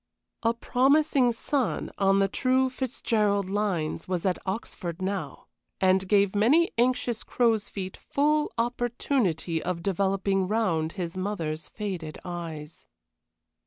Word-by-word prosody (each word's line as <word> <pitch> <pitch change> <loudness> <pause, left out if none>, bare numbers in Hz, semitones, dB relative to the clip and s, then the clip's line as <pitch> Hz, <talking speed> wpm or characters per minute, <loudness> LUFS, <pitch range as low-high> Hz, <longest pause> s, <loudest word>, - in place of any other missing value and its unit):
A 230 0 +1
promising 265 +1 +3
son, 255 +2 -1
on 195 0 +4
the 195 0 +3
true 260 +5 +1
Fitzgerald 215 -6 0
lines, 190 -7 -1
was 180 -1 -2
at 185 -2 +1
Oxford 190 -3 -4
now, 190 0 -4 0.3
and 190 0 +3
gave 200 -1 +3
many 280 +12 +4
anxious 240 -1 +1
crows' 225 -4 +1
feet 190 -2 -6
full 300 +1 +1
opportunity 235 - 0
of 175 -1 -3
developing 195 0 +1
round 175 -7 0
his 175 -3 -4
mother's 175 -5 -3
faded 185 -7 -5
eyes. 165 -3 -7
200 Hz, 120 wpm, -27 LUFS, 180-240 Hz, 0.3 s, on